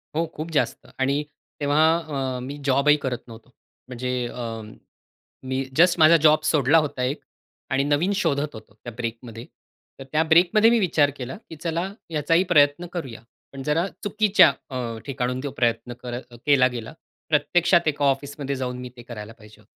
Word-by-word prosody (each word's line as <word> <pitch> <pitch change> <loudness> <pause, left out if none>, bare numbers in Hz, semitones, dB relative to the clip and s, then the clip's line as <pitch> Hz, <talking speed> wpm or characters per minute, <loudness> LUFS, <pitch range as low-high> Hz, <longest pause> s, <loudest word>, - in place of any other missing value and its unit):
हो, 165 - +1
खूप 160 +2 -6
जास्त. 155 - -1
आणि 140 +3 +1 0.4
तेव्हा 145 +2 +2 0.5
अ, - - -5
मी 140 +3 -6
जॉबही 140 +2 +4
करत 130 -4 -4
नव्हतो. 115 +1 -13 0.4
म्हणजे 125 0 -5 0.2
अ, 115 -2 -6 0.8
मी 130 +1 -2
जस्ट 175 +1 +5
माझा 160 +2 +7
जॉब 155 0 +6
सोडला 150 -1 +3
होता 145 -5 0
एक 135 +4 -1 0.5
आणि 135 +1 +1
नवीन 145 +7 +1
शोधत 150 -5 0
होतो 110 -2 -12
त्या 110 +3 -10
ब्रेकमध्ये. 115 0 -6 0.5
तर - - -7
त्या 155 +1 +2
ब्रेकमध्ये 175 +7 +5
मी 235 0 +3
विचार 155 -7 +3
केला, 130 0 -6
की 160 - -8
चला 170 +4 -3 0.2
याचाही 165 +3 +2
प्रयत्न 145 +2 +4
करूया. 130 -10 -6 0.3
पण 135 -1 -7
जरा 160 +6 +1 0.2
चुकीच्या 205 -5 +5 0.2
अ, 120 -4 -4
ठिकाणहून 125 -2 -2
तो 140 - -3
प्रयत्न 120 +1 0
कर 120 -1 -4 0.3
केला 140 -3 +5
गेला. 120 +2 -7 0.4
प्रत्यक्षात 170 +3 +3
एका 145 -1 +1
ऑफिसमध्ये 140 0 -1
जाऊन 125 -1 -4
मी 125 0 -7
ते - - -9
करायला 115 -2 -9
पाहिजे 105 -2 -18
होतं. - - -26
140 Hz, 165 wpm, -24 LUFS, 125-160 Hz, 0.8 s, माझा